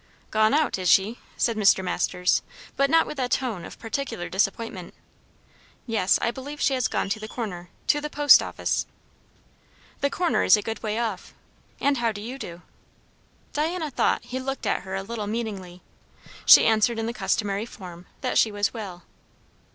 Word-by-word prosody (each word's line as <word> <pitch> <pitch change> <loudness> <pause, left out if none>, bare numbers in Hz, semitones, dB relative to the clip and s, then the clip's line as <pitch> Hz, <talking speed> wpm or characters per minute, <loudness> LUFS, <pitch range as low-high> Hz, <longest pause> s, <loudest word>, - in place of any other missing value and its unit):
"Gone 215 0 +3
out, 300 -9 +1
is 180 -1 0
she?" 200 +7 +3 0.2
said 230 - +1
Mr. 200 -3 +4
Masters, 180 0 +1 0.3
but 275 0 +2
not 325 +2 +5
with 300 - -7
a 250 -1 0
tone 240 -10 -1
of - - -10
particular 225 -6 -4
disappointment. 195 -1 -2 0.9
"Yes. 215 -5 +2
I 235 - +2
believe 285 +4 -8
she 275 - +2
has 255 -3 +1
gone - - -1
to 210 +2 -1
the 215 - -7
Corner 190 -7 -6 0.2
to 295 - +2
the 300 - -4
post 290 0 +7
office." - - -2 1.1
"The 280 - +1
Corner 350 +3 +1
is - - +6
a 210 - -4
good 225 0 -5
way 215 0 -2
off. 225 -5 -3 0.4
And 280 0 +2
how 235 -1 +1
do 205 - -7
you 245 +6 -7
do?" 175 -7 -8 0.9
Diana 315 +1 -1
thought - - +1
he 260 - -4
looked 270 +1 -4
at - - 0
her 190 0 -6
a 195 - -3
little 215 0 -5
meaningly. 200 -5 -5 0.6
She - - +9
answered 225 +1 +3
in 225 - -2
the 230 - -3
customary 205 -2 -1
form, 180 -5 -11
that - - +1
she 220 - +3
was 205 0 0
well. 195 -6 -7
225 Hz, 180 wpm, -25 LUFS, 195-260 Hz, 1.1 s, She